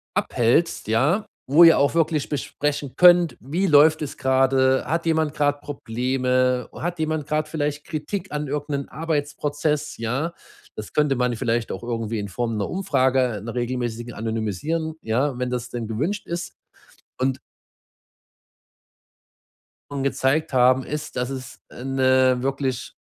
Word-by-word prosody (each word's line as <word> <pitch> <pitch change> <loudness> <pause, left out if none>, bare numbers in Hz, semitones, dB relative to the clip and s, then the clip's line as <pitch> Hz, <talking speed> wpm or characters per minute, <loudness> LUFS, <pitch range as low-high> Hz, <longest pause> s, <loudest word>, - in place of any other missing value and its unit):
abhältst, 120 +4 +1
ja, 145 - +2 0.2
wo 155 +5 +7
ihr 165 -3 +8
auch 140 +3 +2
wirklich 160 -3 +1
besprechen 145 -1 -3
könnt, 175 -2 +6
wie 170 +9 -1
läuft 155 +1 +6
es 150 - -5
gerade? 130 0 +3
Hat 165 +1 -1
jemand 160 -2 +1
grad 145 -1 0
Probleme? 125 -1 0
Hat 175 0 -4
jemand 155 -1 -1
grad 155 0 0
vielleicht 150 -2 -3
Kritik 180 +5 -4
an 150 -1 -2
irgend 145 +1 -3
'nen 140 -1 -3
Arbeitsprozess, 150 -1 -2
ja? 135 +9 -2 0.4
Das 105 - -7
könnte 150 -2 +2
man 125 -1 0
vielleicht 115 +1 -1
auch - - -6
irgendwie 115 -2 -3
in 100 - -4
Form 115 +1 -2
'ner 100 - -2
Umfrage, 130 - +1
'ner 115 +1 -6
regelmäßigen, 120 -1 -3
anonymisieren, 115 - -2
ja, 125 +4 0
wenn 125 0 -1
das 125 -1 -3
denn 120 -3 -5
gewünscht 155 - -2
ist. 170 0 -4 0.7
Und 130 0 0 2.5
und 140 -1 -3
gezeigt 140 +3 0
haben 130 0 +4
ist, 150 0 -5
dass 125 +1 -1
es 130 -2 -7
eine 130 -1 +2
wirklich 135 -2 -2
135 Hz, 140 wpm, -23 LUFS, 125-155 Hz, 2.5 s, ihr